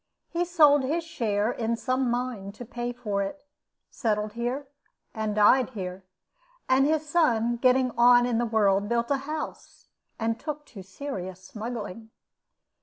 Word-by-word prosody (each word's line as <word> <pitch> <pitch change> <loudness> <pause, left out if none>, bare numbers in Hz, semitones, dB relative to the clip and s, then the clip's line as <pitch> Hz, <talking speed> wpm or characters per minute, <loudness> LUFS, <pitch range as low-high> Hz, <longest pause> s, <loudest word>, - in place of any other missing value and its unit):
He 345 +1 -1
sold 300 -5 +5
his 310 +6 -1
share 225 -9 -1
in 230 -1 -1
some 255 +1 0
mine 240 -5 -3
to 245 +4 -9
pay 240 +1 -4
for 215 -5 -2
it, 240 +10 -5 0.5
settled 210 -2 -1
here, 245 +5 -3 0.5
and 220 -2 -2
died 230 +5 +5
here; 185 0 -5 0.6
and 265 +2 +4
his 310 0 0
son, 240 -8 +2
getting 255 +1 +3
on 245 +1 +6
in 240 -2 0
the 240 - 0
world, 205 -2 +2
built 235 +2 0
a 280 - +3
house, 310 0 -6 0.3
and 225 0 -1
took 300 -1 -5
to 200 - -8
serious 190 -3 -7
smuggling. 220 0 -6
240 Hz, 150 wpm, -27 LUFS, 210-265 Hz, 0.6 s, on